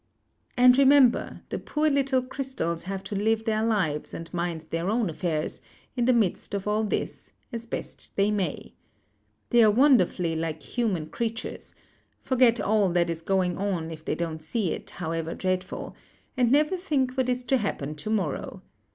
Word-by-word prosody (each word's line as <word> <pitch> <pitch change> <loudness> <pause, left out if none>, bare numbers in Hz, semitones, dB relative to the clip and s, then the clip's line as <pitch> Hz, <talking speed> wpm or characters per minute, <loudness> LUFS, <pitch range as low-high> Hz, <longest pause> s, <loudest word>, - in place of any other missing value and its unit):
"And, 250 +1 +7
remember, 275 -3 +4
the - - -3
poor 305 +1 0
little 275 -3 +2
crystals 255 -12 -3
have 195 0 -4
to 205 - -5
live 220 +2 +1
their 220 -1 +1
lives, 185 -10 0
and 165 +1 -8
mind 170 -2 -2
their 165 +3 -1
own 220 -4 +1
affairs, 155 -2 -2 0.3
in 240 -2 +1
the 255 - +5
midst 215 -3 0
of 200 0 -4
all 210 +1 +1
this, 210 - -3 0.2
as 230 0 -5
best - - -6
they 200 +1 +2
may. 200 -3 -3 0.8
They 240 -1 +6
are 215 - +7
wonderfully 205 - +3
like 160 -1 -3
human 195 -11 -2
creatures 230 0 -5 0.2
— - - -41
forget 250 -2 +4
all 210 -2 +2
that 170 -1 +2
is 165 0 -4
going 185 0 0
on 180 -5 -2
if 155 -1 -9
they - - -1
don't 160 -2 -4
see 180 +3 -1
it, - - -5
however 165 -1 -4
dreadful; 185 0 -3 0.4
and 245 -2 +2
never 300 +6 +3
think 285 -8 0
what 260 -1 0
is 250 0 0
to 265 +2 +2
happen 155 - -3
to 180 - -5
morrow. 190 -10 -2
210 Hz, 175 wpm, -26 LUFS, 170-245 Hz, 0.8 s, And